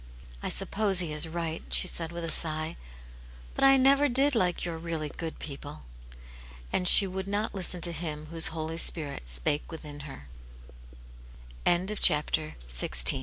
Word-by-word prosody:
I - - -5
suppose 200 -3 0
he 170 -4 -2
is 150 +2 +1
right," 165 0 -5
she - - 0
said, 165 -1 -1
with 170 0 -7
a 165 - -3
sigh; 155 0 +1 0.8
"but - - -4
I 270 0 +5
never 275 +2 +3
did 275 +3 +3
like 180 -7 -1
your 165 -2 -6
really 165 -2 -6
good 165 +2 -8
people." 140 - -10 0.9
And 180 - +4
she 200 - +11
would 190 0 -7
not 205 +2 -3
listen 180 -2 -1
to 170 - +2
Him 155 -2 -7
whose 165 -1 +1
Holy 160 0 -6
Spirit 145 - -2
spake - - -1
170 Hz, 135 wpm, -26 LUFS, 155-190 Hz, 0.9 s, she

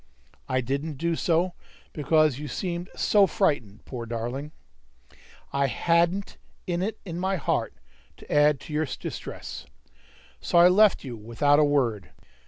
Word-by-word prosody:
I 130 0 +1
didn't 140 +5 -3
do 170 +3 0
so, 170 +2 +1 0.4
because 155 -2 +2
you 150 - -5
seemed 175 +5 -4
so 205 -2 +4
frightened, 110 - -1
poor 120 -3 -6
darling! 120 +6 -4 1.0
I 140 0 +2
hadn't 170 +7 +1 0.3
it 185 +5 -2
in 170 -2 -5
my 190 +1 0
heart 160 - -1 0.4
to - - -13
add 145 -1 +4
to 150 - -9
your 155 0 0
distress. 65 - -7 0.7
So - - 0
I 175 +1 +8
left 205 +2 +4
you 125 -4 -6
without 115 +7 +2
a - - +5
word. 125 -9 +1
150 Hz, 140 wpm, -26 LUFS, 130-175 Hz, 1.0 s, I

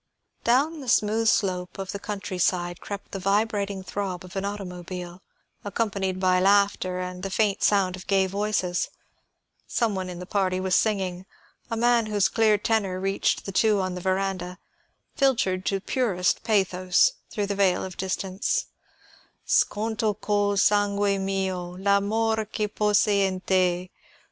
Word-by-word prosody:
Down 285 +7 +2
the 265 -4 -6
smooth 220 +1 +2
slope 185 -4 0
of 195 -1 -4
the 200 - -5
country 195 -3 -5
side 175 -1 0
crept 200 -1 -7
the 195 - -4
vibrating 200 0 0
throb 185 -2 -4
of 180 - -13
an 195 - -2
automobile, 180 -3 -6 0.4
accompanied 200 -3 -2
by 185 -1 +3
laughter 195 -1 +2
and 180 0 -5
the 195 - -3
faint 205 0 +1
sound 195 -3 +2
of 185 - -12
gay 195 -1 +3
voices. 190 -2 -1 0.8
Some 230 -4 0
one 185 -1 -3
in 180 - -7
the 180 - -7
party 185 -1 0
was 185 -1 +1
singing 190 -4 0 0.4
a 230 - -2
man 235 -1 +3
whose 205 -2 +2
clear 220 -2 +3
tenor 200 -3 0
reached 195 +1 0
the 195 - -4
two 210 +1 +3
on 185 -1 -1
the 180 - -6
veranda, 185 -1 -2 0.6
filtered 225 -9 +1
to 195 - +1
purest 195 -5 0
pathos 185 - +3 0.2
through 205 -2 -2
the 200 - -2
veil 195 -2 +2
of 185 -1 -6
distance: 190 +1 -1 0.8
"_Sconto 215 0 +1
col 205 -1 +1
sangue 205 0 +2
mio 190 -2 -2
L'amor 215 +3 +1
que 210 0 -2
posi 210 0 +2
in 185 -1 -4
te! 185 -1 +1
195 Hz, 150 wpm, -25 LUFS, 185-210 Hz, 0.8 s, by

